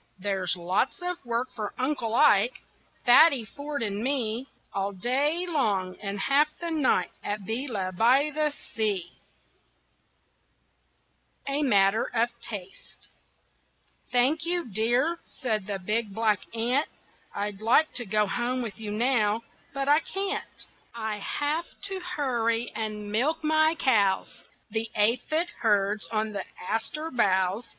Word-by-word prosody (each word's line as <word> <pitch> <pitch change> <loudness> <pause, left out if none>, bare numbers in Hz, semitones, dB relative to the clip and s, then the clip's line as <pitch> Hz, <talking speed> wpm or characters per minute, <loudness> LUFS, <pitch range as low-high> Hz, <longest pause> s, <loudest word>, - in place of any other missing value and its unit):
There's 190 -2 0
lots 185 +9 0
of 360 -2 -3
work 240 +1 -1
for 210 -3 -4
Uncle 255 -4 -1
Ike, 215 +1 +4 0.4
Fatty 265 -1 +7
Ford 285 +2 -5
and 205 -1 -2
me 250 -2 -1 0.3
All 200 0 -1
day 280 - 0
long 205 - 0
and 200 -1 -4
half 280 +7 +4
the 340 -1 -4
night 265 - +2
At 205 0 -3
Beela 215 -4 -3
by 260 +9 +4
the 305 0 +1 0.2
sea. 200 -6 -1 2.4
A 280 +2 +1
MATTER 205 -5 +3
OF 235 +1 +3
TASTE 195 -5 -9 1.0
"Thank 260 +6 +3
you, 345 +1 +1
dear," 245 - +2
said 215 -7 -3
the 200 -1 -2
big 210 +2 -2
black 215 -3 +2 0.2
ant, 245 +6 +1 0.5
"I'd 205 0 -3
like 250 +8 +4
to 245 - -1
go 210 +1 +2
home 245 +4 -1
with 225 -3 -7
you 215 -2 -5
now, 220 -1 +1 0.3
but 275 0 -3
I 295 +2 +6
can't. 390 +4 -4 0.3
I 220 -2 -3
have 295 +10 -2
to 390 -1 -2
hurry 245 -10 -1
and 210 -2 -4
milk 290 +10 +1
my 315 +1 +3
cows 205 -10 +2 0.3
The 225 +1 -1
aphid 255 +11 +2
herds 205 -1 +1
on 215 -1 -2
the 200 -2 -4
aster 225 - -3
boughs." 195 -1 +1
230 Hz, 130 wpm, -27 LUFS, 205-285 Hz, 2.4 s, Fatty